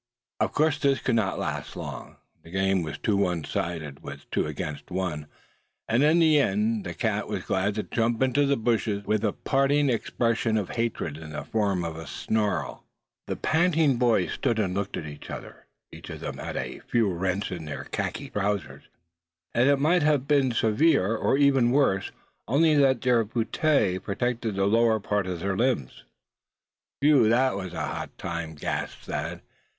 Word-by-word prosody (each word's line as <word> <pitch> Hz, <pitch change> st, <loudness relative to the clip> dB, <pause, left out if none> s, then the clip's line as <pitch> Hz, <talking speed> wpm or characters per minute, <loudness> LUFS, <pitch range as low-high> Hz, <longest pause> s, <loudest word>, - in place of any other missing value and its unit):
Of -, -, +1 dB
course 155 Hz, 0 st, +2 dB
this 140 Hz, -1 st, +2 dB
could 125 Hz, -, -1 dB
not 110 Hz, -4 st, +1 dB
last -, -, -4 dB
long. -, -, -7 dB, 0.3 s
The 80 Hz, -, -15 dB
game 95 Hz, +1 st, +1 dB
was 75 Hz, -3 st, -5 dB
too 105 Hz, -, 0 dB
one 90 Hz, -5 st, 0 dB
sided, 75 Hz, -3 st, -4 dB
with 70 Hz, 0 st, -9 dB
two -, -, 0 dB
against 75 Hz, -1 st, -5 dB
one; 90 Hz, -5 st, -3 dB, 0.6 s
and 115 Hz, +3 st, +2 dB
in 155 Hz, +3 st, +5 dB
the 160 Hz, -3 st, +5 dB
end 105 Hz, -2 st, +1 dB
the 85 Hz, -2 st, -5 dB
cat -, -, -1 dB
was -, -, -3 dB
glad 100 Hz, +2 st, 0 dB
to 105 Hz, -, -1 dB
jump 115 Hz, +1 st, 0 dB
into 130 Hz, +2 st, +2 dB
the 140 Hz, 0 st, +2 dB
bushes, 110 Hz, -3 st, 0 dB
with 110 Hz, 0 st, 0 dB
a 105 Hz, -, +2 dB
parting 140 Hz, +3 st, +2 dB
expression 115 Hz, -1 st, 0 dB
of 100 Hz, -4 st, -2 dB
hatred 115 Hz, -10 st, -2 dB
in 80 Hz, -1 st, -9 dB
the 75 Hz, -, -4 dB
form 100 Hz, -5 st, 0 dB
of 80 Hz, -1 st, -5 dB
a 80 Hz, -2 st, -8 dB
snarl. 105 Hz, +5 st, -2 dB, 0.4 s
The -, -, -2 dB
panting 160 Hz, -5 st, +2 dB
boys 115 Hz, -7 st, +2 dB
stood 115 Hz, -, 0 dB
and 100 Hz, -4 st, 0 dB
looked 100 Hz, +1 st, -2 dB
at 80 Hz, -, -5 dB
each 75 Hz, -1 st, -9 dB
other. -, -, -9 dB, 0.2 s
Each -, -, -11 dB
of -, -, -7 dB
them -, -, -5 dB
had -, -, -5 dB
a -, -, -4 dB
few 115 Hz, -3 st, +3 dB
rents 95 Hz, +2 st, -2 dB
in 85 Hz, -3 st, -5 dB
their 75 Hz, -, -5 dB
khaki -, -, -4 dB
trousers; 100 Hz, -3 st, -2 dB, 0.7 s
and 135 Hz, +3 st, +4 dB
might 165 Hz, +5 st, +3 dB
have 145 Hz, -3 st, +2 dB
been 140 Hz, -3 st, +3 dB
served 110 Hz, -1 st, 0 dB
even 135 Hz, -, +3 dB
worse 125 Hz, -8 st, +2 dB, 0.4 s
only 155 Hz, +6 st, +4 dB
that 135 Hz, -4 st, +4 dB
their 120 Hz, -2 st, +3 dB
puttees 110 Hz, -2 st, +1 dB
protected 115 Hz, +1 st, -2 dB
the 95 Hz, 0 st, +1 dB
lower 110 Hz, +1 st, +3 dB
part 100 Hz, -1 st, -1 dB
of 90 Hz, -2 st, -4 dB
their 100 Hz, 0 st, -1 dB
limbs. 115 Hz, -, -1 dB, 1.0 s
"Whew! 140 Hz, -6 st, +5 dB
that 130 Hz, +2 st, +3 dB
was 95 Hz, -3 st, -5 dB
a -, -, -4 dB
hot -, -, -6 dB
time!" 85 Hz, -2 st, -5 dB
gasped 75 Hz, -, -4 dB
Thad. -, -, -4 dB
110 Hz, 175 wpm, -26 LUFS, 95-130 Hz, 1.0 s, in